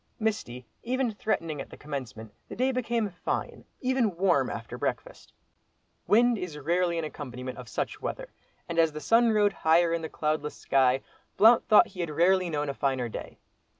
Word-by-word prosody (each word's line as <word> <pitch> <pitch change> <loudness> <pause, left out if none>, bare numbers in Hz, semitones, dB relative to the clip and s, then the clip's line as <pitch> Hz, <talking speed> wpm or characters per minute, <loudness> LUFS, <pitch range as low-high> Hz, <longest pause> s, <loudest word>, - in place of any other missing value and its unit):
Misty, 165 - -2 0.2
even 255 0 -1
threatening, 165 -8 -2
at - - -9
the - - -12
commencement, 130 -7 -7 0.2
the - - -7
day 260 +2 +1
became 235 -3 -1
fine, 175 - -4 0.2
even 250 -8 +1
warm, 185 -1 +2
after - - -6
breakfast. - - -4 0.8
Wind 235 +1 +4
is 170 -5 -6
rarely 170 +4 0
an 165 - -2
accompaniment 130 -4 -7
of 125 -2 -10
such - - -4
weather, - - -5 0.3
and 170 0 -2
as 165 -2 +3
the 155 - -5
sun 230 +10 +4
rode 205 -2 +3
higher 165 0 +3
in 170 - -1
the 160 - -5
cloudless 150 -1 -2
sky, 130 -1 +2 0.3
Blount 225 +2 +6
thought 215 - +6
he 185 - -13
had 170 -2 -2
rarely 180 +4 +3
known 150 -2 -2
a 140 - -2
finer 130 -4 -1
day. - - -8
170 Hz, 180 wpm, -28 LUFS, 145-215 Hz, 0.8 s, Blount